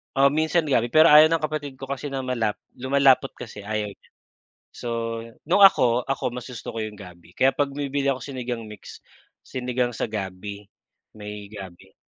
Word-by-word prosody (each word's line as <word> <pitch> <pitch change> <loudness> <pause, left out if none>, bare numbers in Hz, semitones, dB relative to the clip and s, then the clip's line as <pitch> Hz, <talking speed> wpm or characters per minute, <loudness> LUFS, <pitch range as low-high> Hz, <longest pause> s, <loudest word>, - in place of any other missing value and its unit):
Oh, 135 +1 +5
minsan 160 +3 +1
gabi, 120 -3 +2
pero 155 +6 +6
ayaw 155 +1 +9
ng 165 0 0
kapatid 150 -2 -3
ko 135 0 -9
kasi 140 +1 -4
na 135 -1 -4
malap 115 -5 -1 0.2
lumalapot 135 +1 +3
kasi 110 -3 -9
ayaw 105 -1 -2
niya. - - -21 0.7
So 120 - -6 0.6
nung 185 +4 +4
ako, 125 -10 +5
ako 135 -2 -2
mas 125 +1 -7
gusto 115 -2 -7
ko 115 - -4
'yong 105 -1 -6
gabi, 90 -3 -13
kaya 130 +7 +2
'pag 145 -1 0
bumibili 140 -1 -1
ako 130 - -2
Sinigang 125 -3 -5
Mix, 105 -1 -11 0.4
sinigang 125 -1 -2
sa - - -2
gabi, 100 0 -6 0.5
may 105 -1 -8
gabi. 95 -4 -11
125 Hz, 175 wpm, -24 LUFS, 105-140 Hz, 0.7 s, ayaw